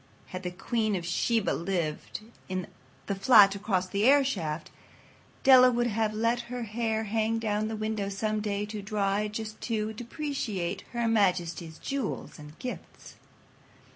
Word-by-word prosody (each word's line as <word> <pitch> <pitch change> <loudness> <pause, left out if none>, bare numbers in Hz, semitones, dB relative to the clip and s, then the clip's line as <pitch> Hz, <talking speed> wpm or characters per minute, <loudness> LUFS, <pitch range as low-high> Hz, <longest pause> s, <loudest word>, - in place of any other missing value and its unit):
Had 185 - -5
the 180 - -3
queen 215 +4 -1
of 175 -2 -3
Sheba 220 +5 +1
lived 170 0 -2 0.3
in 185 -1 -2 0.4
the 200 - -1
flat 195 0 +7
across 195 -2 -1
the 200 +2 -2
airshaft, 220 - +2 0.7
Della 255 -1 +8
would 240 -1 +1
have 220 -1 0
let 230 +3 +1
her 250 -1 -4
hair 220 0 -1
hang 225 +1 -1
out 210 0 0
the 220 - -3
window 215 -2 -2
some 215 +2 -1
day 205 -1 -2
to 210 0 -6
dry 200 0 0
just 215 0 -6
to 220 -2 -2
depreciate 235 - -3
Her 235 -1 0
Majesty's 175 -6 +1
jewels 275 - -4
and 150 +1 -12
gifts. 250 - -8
215 Hz, 145 wpm, -28 LUFS, 195-225 Hz, 0.7 s, Della